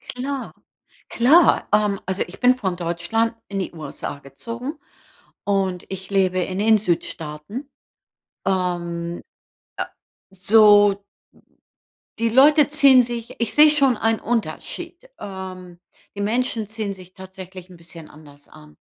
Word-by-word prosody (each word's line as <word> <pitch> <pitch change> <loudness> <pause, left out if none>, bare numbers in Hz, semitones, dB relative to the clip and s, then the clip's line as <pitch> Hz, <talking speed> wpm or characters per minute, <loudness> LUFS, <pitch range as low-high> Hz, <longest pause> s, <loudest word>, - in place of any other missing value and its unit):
Klar, 270 +1 -4 0.6
klar. 290 +8 +4
Ähm, 210 -2 +2
also 190 +1 -3
ich 175 - -13
bin 250 +1 +4
von 190 -7 -2
Deutschland 175 +7 -1
in 195 -1 -4
die 190 - -3
USA 150 -2 -7
gezogen 235 - -8 0.6
und 195 -3 -1
ich 190 0 -7
lebe 185 -2 +1
in 185 +2 -3
den 220 +1 +4
Südstaaten, 175 - -4 0.8
ähm, 175 -2 -2 0.6
äh, - - -2 0.5
so 205 +1 +5 1.2
die 230 0 +1
Leute 290 +5 +6
ziehen 280 -3 +6
sich 235 -1 -5
ich 235 - -1
sehe 300 +1 +8
schon 275 -4 +3
einen 225 0 0
Unterschied. 240 - -4
Ähm, 185 -2 -8 0.4
die 200 - -4
Menschen 230 0 -1
ziehen 215 -2 -4
sich 185 -1 -15
tatsächlich 190 -1 -11
‘n 180 - -14
bisschen 165 -1 -13
anders 145 -2 -17
an. 150 -1 -16
195 Hz, 125 wpm, -22 LUFS, 180-235 Hz, 1.2 s, sehe